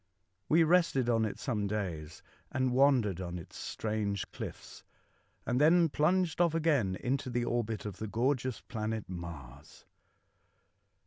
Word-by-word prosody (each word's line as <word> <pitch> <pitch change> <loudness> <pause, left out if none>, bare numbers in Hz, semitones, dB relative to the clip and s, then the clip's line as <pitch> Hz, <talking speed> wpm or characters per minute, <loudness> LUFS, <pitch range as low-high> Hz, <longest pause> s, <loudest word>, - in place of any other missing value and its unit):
We 165 +2 +6
rested 160 -7 +3
on 115 -1 +2
it 105 - -4
some 105 -6 -2
days 85 -7 -4 0.3
and 130 -1 0
wandered 125 -9 +3
on 90 -1 -4
its 85 - -11
strange 105 -2 -3
cliffs, - - -8 0.6
and 125 +2 +1
then 165 +2 +5
plunged 170 +2 +2
off 170 -2 +3
again 145 - +2
into 130 +5 -2
the 120 0 -1
orbit 115 -3 -2
of 100 -3 -5
the 110 - -4
gorgeous 125 +2 0
planet 110 -2 -4
Mars. 80 -6 -9
115 Hz, 135 wpm, -31 LUFS, 100-140 Hz, 0.6 s, We